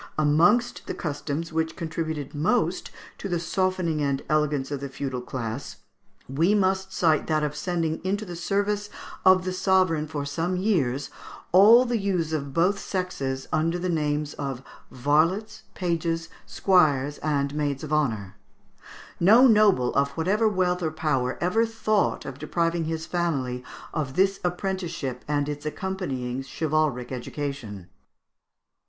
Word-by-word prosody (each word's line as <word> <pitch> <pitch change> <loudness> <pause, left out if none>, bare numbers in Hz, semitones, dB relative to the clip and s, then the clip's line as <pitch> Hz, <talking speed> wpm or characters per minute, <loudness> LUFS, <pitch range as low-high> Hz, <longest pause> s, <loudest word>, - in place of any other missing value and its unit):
Amongst 170 +11 +3
the - - -3
customs 155 +1 -4
which 160 0 -1
contributed 160 -4 -4
most 170 +4 0 0.3
to 200 - -5
the 175 -2 0
softening 175 -2 0
and 140 -1 0
elegance 150 -3 +1
of 145 - -2
the 140 0 -5
feudal 130 -2 -4
class, 125 0 -5 0.5
we 165 +10 +2
must 190 -1 +1
cite 160 -5 +2
that 155 -1 +1
of 150 0 -2
sending 165 0 -2
into 200 +3 -1
the 175 -3 -7
service 205 +4 -1 0.3
of 185 -1 +6
the 185 - -2
sovereign 185 -5 +2
for 145 -2 -4
some 165 +5 -1
years 145 - 0 0.4
all 220 +7 +8
the 240 -2 0
youths 180 -5 -1
of 140 -3 -2
both 180 +7 +2
sexes, 140 -9 -3
under 165 +2 +1
the 180 +1 -2
names 150 -2 -1
of 135 -3 -4 0.3
varlets, 175 - 0
pages, 165 -2 -1 0.2
squires, 145 -7 +2
and 140 -2 0
maids 145 -2 -2
of 155 0 -4
honour. 110 -11 -1 0.8
No 220 +9 +7
noble, 210 - +4
of 140 0 +2
whatever 205 +7 +2
wealth 180 -2 0
or 160 - 0
power, 140 -5 -1
ever 180 +6 +2
thought 220 -2 0
of 135 -1 -7
depriving 165 +1 0
his 160 0 -3
family 140 -9 -2 0.3
of 140 -4 -3
this 195 +1 +2
apprenticeship 175 -8 -3
and 145 -1 0
its 145 0 -5
accompanying 150 -8 -3
chivalric 145 -2 -1
education. 125 - -5
160 Hz, 140 wpm, -25 LUFS, 140-185 Hz, 0.8 s, all